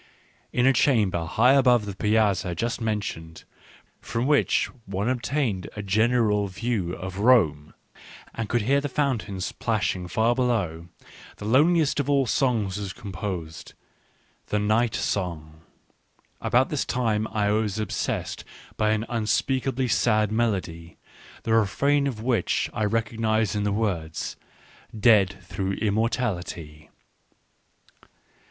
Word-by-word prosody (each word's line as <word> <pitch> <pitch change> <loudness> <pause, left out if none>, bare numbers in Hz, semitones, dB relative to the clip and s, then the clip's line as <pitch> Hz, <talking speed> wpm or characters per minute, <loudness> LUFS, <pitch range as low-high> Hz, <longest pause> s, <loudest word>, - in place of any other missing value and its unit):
In 125 - +1
a 135 - +5
chamber 105 - +2
high 120 +10 +4
above 125 -5 +4
the 100 -2 -6
Piazza 100 -4 +1
just 115 +7 -2
mentioned, 100 -7 -4 0.6
from 115 +2 -3
which 145 +1 +3 0.2
one 100 +2 -2
obtained 125 -5 -1
a 105 - -5
general 105 0 +2
view 95 -2 -2
of 95 +2 -6
Rome, 90 - +3 0.6
and 110 -2 -4
could 120 -3 +1
hear 140 +5 +2
the 145 - -3
fountains 120 -9 -2
plashing 105 -5 -1
far 110 +6 +2
below, 105 -10 -1 0.5
the 105 - -8
loneliest 150 +6 +3
of 140 0 -1
all 140 -2 +3
songs 110 -7 0
was 100 -2 -5
composed 95 -7 -6 0.3
— - - -38
"The 105 - 0
Night 110 +2 +1
Song." 80 -5 -3 0.8
About - - +2
this - - -1
time 110 -3 0
I 105 -2 0
was 105 -1 0
obsessed 105 -3 -3 0.3
by 110 0 +2
an 110 0 -1
un 115 -3 -2
speakably 130 +4 0
sad 110 -3 +2
melody 95 -7 -2 0.4
^ - - -40
the 115 - 0
refrain 140 +7 +2
of 110 -5 -5
which 120 -2 0
I 110 - 0
recognised 110 -1 0
in 105 0 -1
the 105 - +1
affords, 90 -7 -2 0.3
" 110 - -15
dead 100 -4 +4
through 95 +1 -3
immor 110 +2 +1
tality 85 - -4
110 Hz, 135 wpm, -25 LUFS, 95-120 Hz, 0.8 s, a